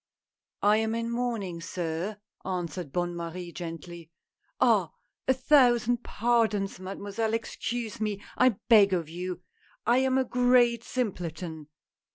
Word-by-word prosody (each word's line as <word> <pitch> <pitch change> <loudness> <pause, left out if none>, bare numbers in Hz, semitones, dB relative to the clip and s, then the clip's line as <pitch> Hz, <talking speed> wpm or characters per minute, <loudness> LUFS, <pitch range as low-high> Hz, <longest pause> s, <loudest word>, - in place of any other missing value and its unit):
"I 210 +1 +5
am 220 0 0
in 230 0 -2
mourning, 230 -8 -2
sir," 170 +4 -3 0.3
answered 180 -4 -4
Bonne 175 +1 -1
Marie 170 +1 -6
gently. 170 -1 -8 0.3
" - - -45
Ah! 220 -9 +4 0.4
a 260 - +5
thousand 245 -3 +4
pardons, 220 -5 +1
mademoiselle, 200 +4 -2
excuse 230 0 -4
me, 210 -2 -1 0.2
I 255 -3 +4
beg 205 -5 +7
of 170 -4 -1
you, 180 +2 -5 0.4
I 240 +3 +4
am 265 0 +2
a 260 - +2
great 245 -1 +3
simpleton 170 - -4
205 Hz, 130 wpm, -28 LUFS, 175-235 Hz, 0.4 s, beg